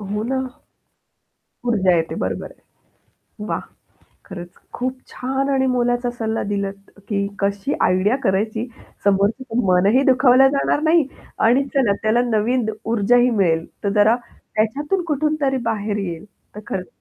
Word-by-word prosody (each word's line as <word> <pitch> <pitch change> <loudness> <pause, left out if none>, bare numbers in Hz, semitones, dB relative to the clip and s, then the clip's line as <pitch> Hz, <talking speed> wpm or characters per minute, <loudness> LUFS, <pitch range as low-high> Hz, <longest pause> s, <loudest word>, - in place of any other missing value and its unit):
हो 205 +1 -3
ना. 260 +4 -1 1.3
ऊर्जा 190 -6 +3
येते, 165 -1 -1
बरोबर - - -3
आहे. - - -21 0.9
वाह! - - -2 0.6
खरंच 175 -2 -9 0.2
खूप 255 +1 -3
छान 270 +2 -2
आणि 265 -1 +2
मोलाचा 245 -1 +1
सल्ला 225 -1 -1
दिलात 200 -1 -4 0.2
की 200 -2 -1
कशी 200 +6 -1
आयडिया 185 +6 +3
करायची, 215 +5 0 0.4
समोरच्याचं 225 +5 +1
मनही 195 +8 +4
दुखावल्या 255 +1 +6
जाणार 280 +1 +1
नाही 320 -1 +4 0.4
आणि 245 +5 +4
चला 255 -7 +3
त्याला 220 +2 +3
नवीन 230 +2 +1
द 220 - -1 0.2
ऊर्जाही 240 +3 +4
मिळेल, 170 -8 +1 0.2
तर 200 - +1
जरा 210 +2 +5 0.4
त्याच्यातून 290 - 0
कुठून 305 0 +1
तरी 270 -1 +1
बाहेर 210 -1 -2
येईल. 175 -3 -4 0.3
तर - - -6
खरंच 185 -1 -4
220 Hz, 140 wpm, -21 LUFS, 200-255 Hz, 1.3 s, दुखावल्या